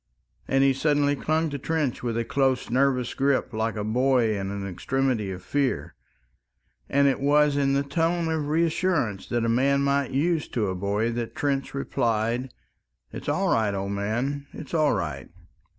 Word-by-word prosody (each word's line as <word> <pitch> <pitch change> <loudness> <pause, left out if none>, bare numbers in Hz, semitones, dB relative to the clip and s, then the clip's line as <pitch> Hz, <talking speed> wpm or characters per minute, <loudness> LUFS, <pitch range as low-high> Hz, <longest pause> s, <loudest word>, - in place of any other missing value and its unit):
And 135 0 +3
he 135 0 +4
suddenly 145 +1 +2
clung 155 +2 0
to 140 - -4
Trench 155 -3 -1
with 115 -2 -2
a 115 - -1
close, 135 -2 0
nervous 130 -1 +1
grip, 135 -2 0
like 110 +1 -1
a 105 - -3
boy 120 0 +2
in 95 -1 -3
an 100 0 -4
extremity 120 +2 -1
of 95 -1 -6
fear. 140 +2 -1 1.0
And 140 0 +4
it 135 - +1
was 145 +1 +3
in 140 -1 +2
the 140 0 +2
tone 165 +4 0
of 155 -2 -1
reassurance 160 - 0
that 120 -1 0
a - - +1
man 135 +4 +2
might 140 0 +1
use 155 +4 0
to 105 -5 -1
a 95 - -2
boy 100 +5 0
that 120 -1 -4
Trench 140 -1 -1
replied, 120 -1 -1 0.6
"It's - - -5
all - - +1
right, 105 -3 +1
old 100 +1 -3
man, 120 +8 -2
it's 155 - -9
all 155 -3 +3
right." 85 -7 -4
135 Hz, 175 wpm, -25 LUFS, 115-145 Hz, 1.0 s, he